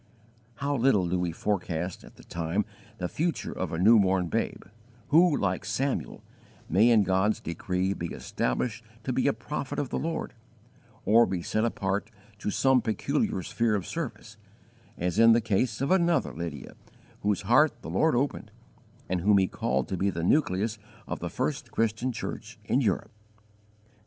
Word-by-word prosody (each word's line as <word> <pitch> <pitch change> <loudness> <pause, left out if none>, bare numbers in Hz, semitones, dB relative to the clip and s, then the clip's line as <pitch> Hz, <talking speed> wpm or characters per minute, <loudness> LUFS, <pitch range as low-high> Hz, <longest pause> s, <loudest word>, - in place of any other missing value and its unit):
How 140 +3 -1
little 115 -8 +3
do 90 +1 0
we 90 -1 -1
forecast 90 -1 -2
at - - -15
the - - -16
time 85 +4 -2 0.3
the 90 - -2
future 165 - -2
of - - -4
a 80 - -2
new 110 +6 +6
born 95 -3 +2
babe - - -2 0.5
who, 165 -1 +5
like 95 -2 -1
Samuel, 135 0 -2 0.4
may 105 +8 +4
in 110 -3 +5
God's 95 +3 +1
decree 90 +3 -2
be 85 - -4
established 110 - -2 0.2
to 130 - -2
be 130 - +1
a - - +5
prophet 130 +4 -5
of 140 - -1
the - - -2
Lord, 165 +1 -3 0.7
or 115 +3 +6
be 90 -3 -3
set 110 - 0
apart 100 -2 -1 0.3
to 105 - -2
some 130 +4 +3
peculiar 105 -4 -1
sphere 115 +2 0
of 100 - -2
service, 120 -8 -6 0.6
as 90 +3 -1
in 115 0 +8
the 115 - +4
case 110 +1 0
of 140 - 0
another 175 -2 +2
Lydia, 80 -5 -6 0.5
whose 105 0 0
heart 135 +9 +3
the - - -6
Lord 160 -4 +3
opened 125 -3 -1 0.6
and 90 -1 -1
whom 100 +2 +5
He 95 - +4
called 65 -5 -1
to 95 - -2
be 100 +3 +1
the 85 -3 -3
nucleus 110 - +1 0.3
of - - -4
the - - -4
first 145 -4 -2
Christian 115 +3 0
church 115 -2 -6
in 130 +5 +2
Europe. 105 -2 0
105 Hz, 170 wpm, -28 LUFS, 95-125 Hz, 0.7 s, in